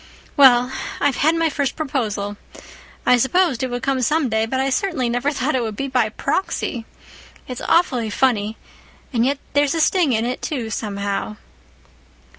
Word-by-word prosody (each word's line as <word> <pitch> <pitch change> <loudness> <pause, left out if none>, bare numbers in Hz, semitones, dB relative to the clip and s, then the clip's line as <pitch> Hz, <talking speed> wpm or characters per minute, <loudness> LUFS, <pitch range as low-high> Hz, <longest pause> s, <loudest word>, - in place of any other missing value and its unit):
Well, 255 -3 +6 0.3
I've 285 -3 +1
had 315 +4 +3
my 330 -1 +1
first 280 -2 -1
proposal. 215 -9 -2 0.7
I 250 - +5
supposed 270 +1 +2
it 260 - -1
would 245 0 -4
come 270 -2 0
some 300 +2 +1
day—but 225 +4 0
I 270 +1 0
certainly 300 - 0
never 245 +4 0
thought 280 +1 -1
it 260 - +1
would 220 -2 -3
be 275 +6 -3
by 250 -5 +1
proxy. 235 - -2 0.6
It's 250 -1 -6
awfully 255 -10 +2
funny—and 225 +1 -2
yet 280 +1 0 0.2
there's 285 +1 +2
a - - 0
sting 320 -3 +3
in 225 +1 +1
it, 250 +1 -3
too, 245 -7 -3
somehow." 205 0 -3
255 Hz, 160 wpm, -21 LUFS, 225-285 Hz, 0.7 s, Well